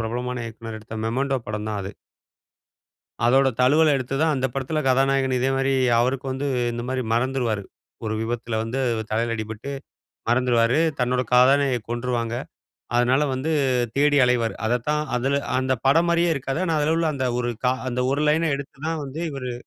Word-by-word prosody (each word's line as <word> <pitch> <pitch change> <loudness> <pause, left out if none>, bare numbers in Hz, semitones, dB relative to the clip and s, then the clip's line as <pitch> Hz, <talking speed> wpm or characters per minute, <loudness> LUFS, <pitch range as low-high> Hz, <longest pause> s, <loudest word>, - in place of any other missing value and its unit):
பிரபலமான 125 +2 -3
இயக்குனர் 115 0 -8
எடுத்த 110 +1 -7
"MEMENTO" 135 +3 0
படம் 105 0 -3
தான் 105 -2 -2
அது. 100 +2 -6 1.3
அதோட 135 +2 +5
தழுவல் 150 +4 +5
எடுத்து 135 0 -2
தான் 160 -2 +2
அந்த 130 0 0
படத்தில 135 +4 -2
கதாநாயகன் 135 0 +2
இதேமாதிரி 135 +1 +1 0.3
அவருக்கு 130 +3 0
வந்து 135 +2 -3 0.3
இந்த 120 0 -4
மாதிரி 130 0 -1
மறந்துருவாரு. 120 -4 0 0.4
ஒரு 110 - -2
விபத்துல 115 -1 -3
வந்து 115 +4 -3 0.3
தலையில 115 +1 0
அடிபட்டு 110 +5 -6 0.6
மறந்துருவாரு. 120 +1 +3 0.2
தன்னோட 125 0 +1
காதலிய 130 0 +5
கொன்றுவாங்க. 120 -1 -2 0.6
அதனால 125 +4 +3
வந்து 135 +5 -2 0.5
தேடி 145 +1 +4
அலைவாரு. 120 -2 +1
அதத்தான் 125 +6 0
அதில 135 +3 +1 0.2
அந்த 130 0 0
படம் 165 +6 +4
மாதிரியே 170 0 +3
இருக்காது. 135 +1 -3
ஆனா, 165 -3 0
அதில 150 +2 +2
உள்ள 165 -1 +1
அந்த 130 -2 -1
ஒரு 120 - -1
க - - +4 0.2
அந்த 125 0 -2
ஒரு 140 +2 0
லைன்‌ன 160 +1 +2
எடுத்து 140 -1 -9
தான் 160 -1 -2
வந்து 140 +4 -6
இவரு 130 -3 -5
130 Hz, 160 wpm, -23 LUFS, 120-140 Hz, 1.3 s, அதோட